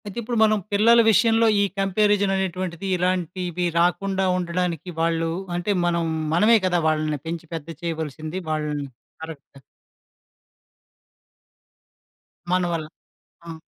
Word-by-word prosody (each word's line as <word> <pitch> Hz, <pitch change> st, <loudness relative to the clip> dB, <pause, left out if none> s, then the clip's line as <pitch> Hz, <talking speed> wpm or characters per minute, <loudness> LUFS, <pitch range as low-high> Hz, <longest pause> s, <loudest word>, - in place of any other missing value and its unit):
అయితే 205 Hz, +1 st, -8 dB
ఇప్పుడు 235 Hz, +1 st, -3 dB
మనం 215 Hz, 0 st, +4 dB, 0.2 s
పిల్లల 230 Hz, +3 st, +5 dB
విషయంలో 225 Hz, +1 st, +4 dB
ఈ -, -, +4 dB, 0.2 s
కంపారిజన్ 200 Hz, 0 st, +2 dB
అనేటువంటిది 185 Hz, -1 st, -3 dB
ఇలాంటివి 180 Hz, 0 st, -1 dB
రాకుండా 190 Hz, +2 st, +1 dB
ఉండడానికి 175 Hz, -1 st, -2 dB
వాళ్ళు 165 Hz, 0 st, 0 dB, 0.3 s
అంటే, 175 Hz, +4 st, -1 dB
మనం 170 Hz, -1 st, 0 dB, 0.3 s
మనమే 215 Hz, +7 st, +5 dB
కదా 180 Hz, -1 st, +2 dB
వాళ్ళని 155 Hz, -1 st, 0 dB
పెంచి 165 Hz, 0 st, -5 dB
పెద్ద 160 Hz, -2 st, -6 dB
చేయవలసింది 160 Hz, 0 st, -4 dB
వాళ్ళని. 150 Hz, -2 st, -2 dB, 0.4 s
కరెక్ట్. 145 Hz, -3 st, -11 dB, 2.9 s
మనవల్ల 175 Hz, -3 st, 0 dB, 0.6 s
ఆ! 165 Hz, -, -6 dB
175 Hz, 105 wpm, -23 LUFS, 165-195 Hz, 2.9 s, పిల్లల